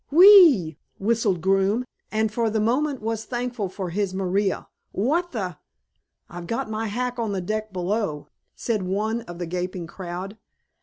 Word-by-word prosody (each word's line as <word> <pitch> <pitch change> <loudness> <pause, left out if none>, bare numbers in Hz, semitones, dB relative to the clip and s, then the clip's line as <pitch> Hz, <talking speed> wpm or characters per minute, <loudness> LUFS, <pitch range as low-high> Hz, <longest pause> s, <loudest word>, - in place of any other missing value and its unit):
"Whe 330 +6 +6
e 395 -4 +11 0.2
ew!" 160 -1 -8 0.2
whistled 205 -4 +1
Groome, 195 +6 +2 0.3
and 220 0 +1
for 230 0 0
the 220 0 0
moment 255 +3 0
was 225 0 -2
thankful 240 -5 -3
for 185 -2 -5
his 195 0 -1
Maria. 195 +1 0 0.2
"What 320 - 0
the 185 - -4 0.4
" - - -48 0.3
"I've 170 0 -8
got 230 0 -3
my 220 +1 -2
hack 245 +3 -3
on 220 -3 -1
the 195 - -1
deck 215 +3 -3
below," 185 -4 -2 0.3
said 225 -4 -1
one 210 +5 -1
of 175 -5 -9
the 175 - -3
gaping 180 +1 -4
crowd. 185 +4 -7
210 Hz, 170 wpm, -24 LUFS, 185-230 Hz, 0.4 s, e